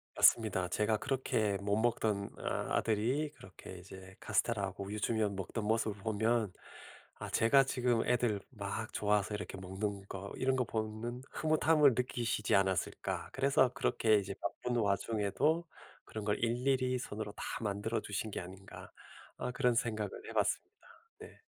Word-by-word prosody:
맞습니다. 95 -6 +4
제가 105 +4 +2
그렇게 110 -6 0
못 100 0 +1
먹던 110 -3 +1
어 - - -10 0.3
아들이 120 +8 +1
그렇게 95 0 -11
이제 95 +1 -12
카스텔라하고 100 -4 0
우유 105 +2 -4
주면 110 -3 +1
먹던 100 +3 -4
모습을 110 -2 0
보면 110 -1 +1 0.6
'아 - - -7
제가 135 +4 +5
지금 125 -3 +1
애들 120 -4 +2
막 110 -1 -4
좋아서 105 0 +1
이렇게 100 -2 -5
먹는 95 +2 -4
거 100 0 -6
이런 130 0 +2
거 130 - +2
보면은 110 +3 -3
흐뭇함을 155 -2 +4
느끼시지 120 -4 0
않았을까?' 95 -2 0
그래서 135 -1 +4
'그렇게 115 -5 +3
이제 100 -1 0
바쁜 120 +4 -2
와중에도 110 - +1 0.4
그런 110 -1 -6
걸 105 0 +1
일일이 125 +2 +1
손으로 105 -3 -5
다 - - -7 0.2
만들어 105 +2 -1
주신 105 +2 -3
게 - - -3
아닌가?' 95 +2 -10 0.5
아 - - -3
그런 125 -1 +2
생각을 110 -3 0 0.2
해 - - -7
봤습니다. - - 0 0.5
네. - - -12
110 Hz, 330 characters per minute, -34 LUFS, 100-120 Hz, 0.6 s, 제가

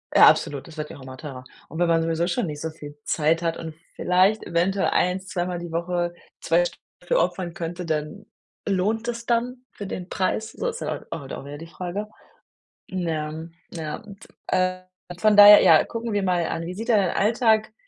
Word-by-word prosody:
Ja, - - +9
absolut, 140 +1 +2
das 160 -1 -13
wird 150 0 -5
ja - - -10
auch 140 - -14
immer 130 0 -10
teurer. 135 -4 -8 0.3
Und 160 - -7
wenn 175 - +3
man 165 -1 +3
sowieso 165 +1 0
schon 210 +3 0
nicht 150 -2 -6
so 160 - -2
viel 145 -2 -11
Zeit 160 +2 +1
hat 165 -1 -1
und 160 -1 -7 0.2
vielleicht 185 +4 +3
eventuell 180 +3 +1
1, 180 +1 +1
2 180 -2 -3
Mal 180 -1 -3
die 170 -1 -7
Woche 175 +1 -1 0.3
zwei 170 +2 +2
Stunden - - -7 0.2
dafür - - +1
opfern 175 -3 -1
könnte, 175 +2 -5
dann 155 +6 -3 0.4
lohnt 215 +5 0
es 235 -1 -3
das - - -18
dann 245 +2 -1
für 200 - -8
den 180 -1 -6
Preis? 215 +4 -1
So - - -4
ist 480 0 -4
ja - - -3
auch 140 -4 -6
auch 135 - -6
wieder 145 +1 -7
die 165 - -9
Frage. 180 +4 -5 0.9
Na 180 -3 -2
ja, 155 +1 -4 0.2
ja, 155 -3 -4
und, 205 -3 -13 0.2
äh, 185 0 +1 0.4
von 215 0 +4
daher 205 0 +11
ja, - - +7
gucken 230 -1 -4
wir 205 - +1
mal 180 -3 +1
an, 165 0 -3
wie 180 - -5
sieht 225 +4 -6
denn 220 -3 +5
dein 185 -3 0
Alltag 220 0 +2
180 Hz, 215 wpm, -24 LUFS, 165-205 Hz, 0.9 s, daher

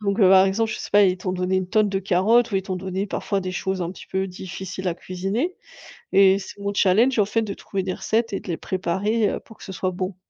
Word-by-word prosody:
donc 200 0 -1
heu, 195 -4 +6
par 190 0 +7
exemple, 220 +3 0
je - - -5
sais - - -7
pas, 205 0 +6
ils 185 -1 +2
t'ont 185 0 -3
donné 185 +1 0
une 185 -1 -1
tonne 215 +1 +3
de 195 -1 -1
carottes 210 +6 +3
ou 200 - 0
ils 190 - 0
t'ont 190 0 -4
donné 190 +2 -3
parfois 200 0 -2
des 185 -1 -4
choses 190 +1 -2
un 170 - -3
petit 190 - -12
peu 190 0 -1
difficiles 185 0 -6
à 170 - -1
cuisiner, 195 - -3 0.6
et 195 0 +5
c'est 200 - -10
mon 200 0 -3
challenge, 215 +6 +3
en 205 - +4
fait, 220 +3 0
de 205 -2 -4
trouver 195 -1 -4
des 185 0 -2
recettes 225 +2 -1
et 195 - -1
de - - -15
les 170 -3 -2
préparer, 200 +4 0
heu, - - -3
pour 225 - -17
que - - -14
ce 195 - -7
soit 185 0 -2
bon. 185 +1 -4
190 Hz, 275 wpm, -23 LUFS, 185-205 Hz, 0.6 s, par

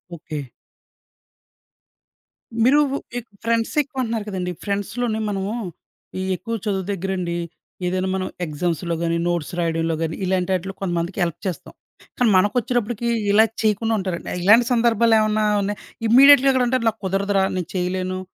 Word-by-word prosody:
Okay. 150 -5 -7 2.1
మీరు 270 +5 +5 0.4
ఎ - - 0 0.2
friends 230 0 0
ఎక్కువ 275 -2 -5
అంటున్నారు 225 -2 -3
కదండీ. 180 -2 -3
ఫ్రెండ్స్‌లోనే 215 +3 -2
మనము 195 0 -2 0.7
ఈ - - -2
ఎక్కువ 230 +5 -6
చదువు 195 -3 -1
దగ్గరండి. 185 -2 -3 0.5
ఏదైనా 185 +1 -1
మనం 185 -1 -2 0.2
ఎగ్జామ్స్‌లో 170 +2 -2
గాని, 170 0 0
నోట్స్ 175 -4 -1
రాయడంలో‌ 165 -1 0
గాని, 160 -1 -2
ఇలాంటాటిలో 185 0 -1
కొంతమందికి 175 0 -2
హెల్ప్ 170 -1 -3
చేస్తాం. 180 - -6 0.4
కానీ 245 -2 +3
మనకొచ్చేటప్పటికి 235 +3 0 0.2
ఇలా 215 +2 +6 0.2
చేయకుండా 220 +1 +1
ఉంటారండి. 185 -3 -4
ఇలాంటి 220 +6 +6
సందర్భాలేమన్నా 225 -2 +3 0.2
ఉన్నాయి? 205 +1 -3 0.3
ఇమ్మీడియేట్‌గా 275 +3 +8
అక్కడ 260 -1 +2
అంటే 255 +2 +2
నాకు 220 - -8
కుదరదురా 195 +1 +1
నేను 180 -1 -4
చేయలేను 185 +1 -2
195 Hz, 130 wpm, -22 LUFS, 180-225 Hz, 2.1 s, ఇమ్మీడియేట్‌గా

